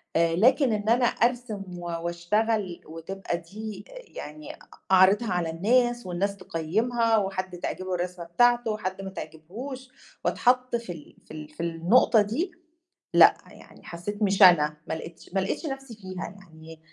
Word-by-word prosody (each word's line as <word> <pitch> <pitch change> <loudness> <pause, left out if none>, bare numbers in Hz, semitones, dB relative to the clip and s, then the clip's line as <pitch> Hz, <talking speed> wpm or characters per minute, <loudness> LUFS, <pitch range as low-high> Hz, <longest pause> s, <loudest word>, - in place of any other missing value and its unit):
آآ، 165 0 +3
لكن 250 - +4
إن 210 +1 -1
أنا 245 +1 +4
أرسِم 235 -3 0 0.2
و 175 - -8
وأشتغل 175 +4 -1
وتبقى 170 +3 -5
دي 200 +4 -8
آآ، - - -14 0.2
يعني 150 0 -8
أ - - -15 0.3
أعرِضها 195 +4 +5
على 175 -2 -1
الناس 240 +8 +1
والناس 195 +3 -2
تقيّمها 225 +7 0
وحد 190 -2 -2
تعجبه 185 +1 -3
الرسمة 180 0 -4
بتاعته 240 +6 +3
وحد 190 -3 -4
ما 195 - -5
تعجبهوش 240 - -8 0.4
واتحَط 250 0 +2
في 235 -5 -4
ال 155 -3 -14
في - - -17
ال 155 -1 -8
في 155 +2 -7
النقطة 170 +7 +4
دي، 255 - -2 0.6
لأ، - - +8 0.2
يعني - - -16
حسّيت 205 +5 -6
مش 200 0 +2
أنا، 150 -5 +7
ما - - -1
لقيتش 165 +1 -10
ما 195 - +3
لقيتش 190 - -3
نفْسي 270 -4 -6
فيها 185 -3 -7 0.2
يعني 160 -3 -14
195 Hz, 155 wpm, -26 LUFS, 170-230 Hz, 0.6 s, لأ